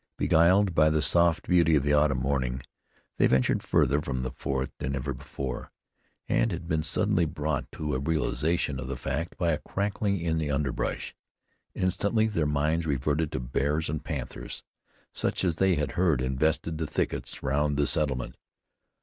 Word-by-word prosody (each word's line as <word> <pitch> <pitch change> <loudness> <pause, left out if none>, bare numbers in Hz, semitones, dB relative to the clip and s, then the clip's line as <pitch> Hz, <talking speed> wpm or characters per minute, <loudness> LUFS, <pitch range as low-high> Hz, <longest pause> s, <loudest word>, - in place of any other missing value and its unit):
Beguiled 90 +4 +4
by 75 -1 +5
the 75 0 +1
soft 85 0 +3
beauty 85 -3 +4
of 70 - +2
the 75 +1 +2
autumn 75 -2 +3
morning 65 -1 -1 0.5
they - - +5
ventured 65 -1 +2
farther 70 +3 +2
from 65 -3 -3
the 65 - -3
fort 65 0 -3
than 70 +1 -2
ever 65 - -3
before, 65 -2 -6 0.6
and - - +2
had 85 - -5
been 80 -1 +1
suddenly 80 +2 +1
brought 75 0 -3
to 75 -1 -3
a 65 - 0
realization 75 0 0
of 65 - -5
the 65 -1 -4
fact 80 +7 -3
by 85 -4 +1
a 75 - 0
crackling 100 0 -1
in 80 -1 0
the 75 -2 -2
underbrush. 70 -2 -2 0.6
Instantly 100 +4 +1
their 85 -9 0
minds 75 +3 0
reverted 75 +3 0
to - - -2
bears 70 +5 -1
and 75 - -4
panthers, 70 -7 -5 0.5
such - - -1
as 85 -3 0
they 95 0 +3
had 75 -2 -1
heard 85 -6 +2
invested 75 +5 0
the 80 - -2
thickets - - -2
round 70 +1 +1
the 70 - +3
settlement. 70 -7 0
75 Hz, 170 wpm, -28 LUFS, 70-80 Hz, 0.6 s, by